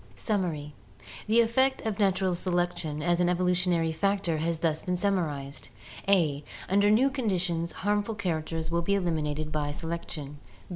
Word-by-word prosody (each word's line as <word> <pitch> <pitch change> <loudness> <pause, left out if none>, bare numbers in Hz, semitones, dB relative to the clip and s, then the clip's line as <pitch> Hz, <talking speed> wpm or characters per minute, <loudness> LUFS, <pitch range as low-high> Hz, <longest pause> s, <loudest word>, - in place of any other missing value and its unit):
Summary. 155 - -2 0.3
— - - -14
The 225 +2 +5
effect 260 +4 +2
of 220 -1 -2
natural 190 -2 +2
selection 175 -4 -1
as 175 +1 +2
an 175 0 +3
evolutionary 180 -2 +2
factor 180 -1 0
has 165 +1 0
thus 160 -1 0
been 180 - -1
summarized: 155 -9 -2 0.4
a. 160 -7 +3 0.2
Under 200 +2 +4
new 250 +6 +4
conditions 180 -9 -1
harmful 205 +2 -1
characters 165 -4 -2
will 170 0 +1
be 200 +4 +1
eliminated 155 -4 -1
by 150 -1 -1
selection. 150 -2 -5
175 Hz, 145 wpm, -28 LUFS, 160-200 Hz, 0.4 s, The